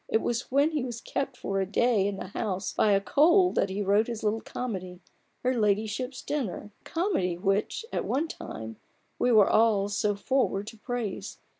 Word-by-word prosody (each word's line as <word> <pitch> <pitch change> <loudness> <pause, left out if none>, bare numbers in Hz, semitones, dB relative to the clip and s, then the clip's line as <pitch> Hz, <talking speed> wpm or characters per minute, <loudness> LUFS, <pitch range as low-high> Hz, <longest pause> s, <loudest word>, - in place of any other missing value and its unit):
It 220 - +2
was 240 0 -2
when 285 +4 +3
he 300 -4 -1
was 240 -3 -5
kept 270 +2 -3
for 195 0 -2
a - - 0
day 220 -4 +3
in 205 - -2
the 185 - -7
house 195 -2 -3
by 210 - +3
a 195 - +4
cold 340 - +4
that 195 - +1
he 200 +2 -2
wrote 205 +3 +3
his 230 -2 -5
little 215 +1 0
comedy, 185 -7 -5 0.4
Her 255 +1 +2
Ladyship's 220 +3 0
Dinner 235 -8 -3
— - - -41
a - - -37
comedy 325 - -1
which, 195 - 0
at - - 0
one 300 +5 0
time, 110 - -7 0.4
we 245 - +3
were 215 -4 +6
all 215 -2 +3
so 205 0 0
forward 205 -2 0
to 225 - -13
praise. 240 -4 -4
220 Hz, 195 wpm, -28 LUFS, 195-255 Hz, 0.4 s, were